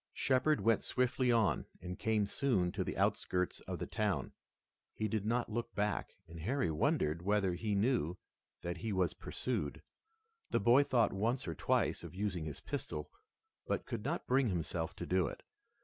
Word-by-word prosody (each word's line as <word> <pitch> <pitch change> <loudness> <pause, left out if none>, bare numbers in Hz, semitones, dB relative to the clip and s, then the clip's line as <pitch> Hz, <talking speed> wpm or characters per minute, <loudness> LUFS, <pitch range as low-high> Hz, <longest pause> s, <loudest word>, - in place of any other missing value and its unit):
Shepard 135 +3 +2
went 115 0 +3
swiftly 125 0 +2
on 115 -4 +2
and 90 +1 -6
came 110 -2 +2
soon 100 -5 +1
to 100 -1 -1
the - - -4
outskirts 90 0 +1
of - - -3
the - - -3
town. 105 0 -1 0.6
He 110 - 0
did 105 0 -1
not 120 0 0
look 115 +1 -3
back 105 0 -1
and 85 0 -9
Harry 105 - 0
wondered 75 +1 +1
whether 100 -1 +2
he 105 +4 -1
knew 100 - +1 0.5
that 85 0 -3
he 110 +6 -3
was 95 -3 +1
pursued. 70 - -3 0.7
The - - +2
boy 120 +4 +6
thought 120 -6 +3
once 115 +6 0
or 85 - -1
twice - - +1
of 85 0 -8
using 95 -5 -2
his 75 - -6
pistol, 75 -1 -4 0.6
but - - -1
could 110 -3 -4
not - - -2
bring 130 -1 +3
himself 85 -2 -2
to - - -5
do 90 -1 +2
it. - - -7
105 Hz, 175 wpm, -35 LUFS, 90-115 Hz, 0.7 s, boy